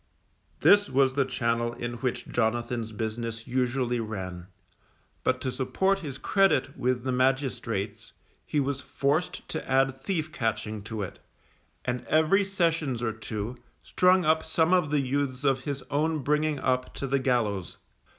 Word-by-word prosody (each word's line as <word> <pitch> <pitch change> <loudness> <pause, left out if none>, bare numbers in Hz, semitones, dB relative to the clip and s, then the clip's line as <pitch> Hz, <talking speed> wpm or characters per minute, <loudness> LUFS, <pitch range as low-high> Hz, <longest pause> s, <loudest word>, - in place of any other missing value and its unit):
This 205 0 +6
was 135 0 +3
the 140 0 +2
channel 120 -2 0
in 120 0 -4
which 125 -1 -2
Jonathan's 120 0 -1
business 115 +1 -4
usually 125 -1 0
ran, 95 -5 -5 0.8
but 130 0 +1
to 130 - -1
support 190 +10 +1
his 145 -7 -6
credit 190 -10 +2
with 125 -1 0
the 130 - -1
magistrates, 125 -5 -1 0.3
he 150 - -1
was 140 0 -1
forced 145 +6 -1
to - - -5
add 135 0 +3
thief 160 -2 -2
catching 110 -4 -2
to 110 -2 -3
it, 90 - -7 0.7
and 125 -1 -2
every 160 +6 +4
sessions 165 -10 0
or 110 -2 0
two, 110 +2 -5 0.2
strung 180 -1 +4
up 160 +1 +3
some 160 +2 +2
of 180 -5 +3
the 150 -1 +2
youths 135 0 -1
of 135 -2 +1
his 140 -2 -3
own 155 +1 +1
bringing 150 +2 +1
up 130 -1 -1
to - - -3
the 135 +1 +1
gallows. 110 -9 0
130 Hz, 150 wpm, -28 LUFS, 115-150 Hz, 0.8 s, This